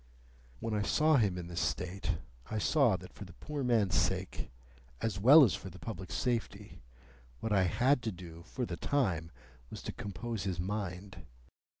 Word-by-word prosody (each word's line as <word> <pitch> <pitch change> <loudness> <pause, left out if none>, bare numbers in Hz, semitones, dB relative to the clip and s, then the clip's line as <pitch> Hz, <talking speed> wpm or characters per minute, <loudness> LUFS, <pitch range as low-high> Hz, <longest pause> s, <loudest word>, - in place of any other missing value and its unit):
When 115 -1 -3
I 105 - +1
saw 155 +8 +4
him 100 -7 +2
in 90 - -5
this 85 0 -4
state, 90 -1 -2 0.3
I 110 - -2
saw 120 -2 +3
that 90 - -12
for - - -9
the 90 -3 -11
poor 150 - -5
man's 110 -7 +2
sake, 95 -2 0 0.5
as 105 -4 -2
well 140 +9 +9
as 115 - +4
for 95 - -5
the 90 - -12
public 95 -3 -7
safety, 120 - -2 0.6
what 110 - -1
I 95 -2 +4
had 125 - +3
to 115 -2 -2
do 85 -3 -10
for 125 +8 -4
the 85 -6 -5
time 95 - 0 0.4
was - - -8
to - - -4
compose 110 +2 -5
his 95 -3 -2
mind. 95 0 -4
100 Hz, 180 wpm, -32 LUFS, 90-120 Hz, 0.6 s, well